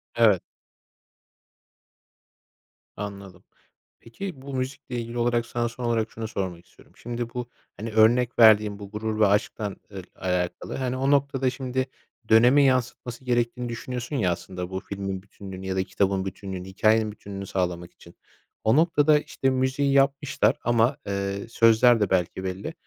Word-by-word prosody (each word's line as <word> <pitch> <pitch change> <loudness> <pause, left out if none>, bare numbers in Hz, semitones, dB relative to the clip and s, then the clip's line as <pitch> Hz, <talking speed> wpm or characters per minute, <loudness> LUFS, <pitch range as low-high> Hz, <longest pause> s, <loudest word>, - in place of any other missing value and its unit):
Evet. 110 -6 +5 2.6
Anladım. 100 -3 -8 0.6
Peki, 135 +5 -8
bu 140 +1 -8
müzikle 130 -1 -4
ilgili 115 +1 -6
olarak 120 0 +1
sana 120 -1 -2
son 125 +2 -8
olarak 115 -2 0
şunu 110 0 -5
sormak 95 -5 -4
istiyorum. - - -22
Şimdi 120 0 -4
bu, 125 -1 -4 0.3
hani, 110 +2 -5
örnek 115 +3 +3
verdiğim 105 -2 +6
bu 100 -1 -9
Gurur 110 0 -3
ve 105 - +6
Aşk'tan 105 0 0 0.2
ıl 95 -2 -7
alakalı, 90 -1 -2
hani, 130 -1 -2
o 135 +2 +1
noktada 140 -2 +2
şimdi 130 0 -2 0.4
dönemi 125 +6 +6
yansıtması 130 -1 -1
gerektiğini 120 0 0
düşünüyorsun 125 +3 -5
ya, 95 -9 +2
aslında 90 +1 -5
bu 95 - -3
filmin 95 -1 -5
bütünlüğünü 95 -2 -9
ya 95 - -2
da 95 - +1
kitabın 95 0 0
bütünlüğünü, 95 -1 -6
hikâyenin 110 +3 +2
bütünlüğünü 100 -1 -8
sağlamak 90 -2 -2
için 85 -1 -17 0.5
o 110 +2 +4
noktada, 155 -2 +4
işte, 135 -2 -1
müziği 130 +2 +1
yapmışlar 135 -4 +2
ama, 120 +3 +2
eee, 100 +1 -3
sözler 115 +1 +5
de 105 - +1
belki 95 0 0
belli. 95 - -4
115 Hz, 145 wpm, -25 LUFS, 100-125 Hz, 2.6 s, verdiğim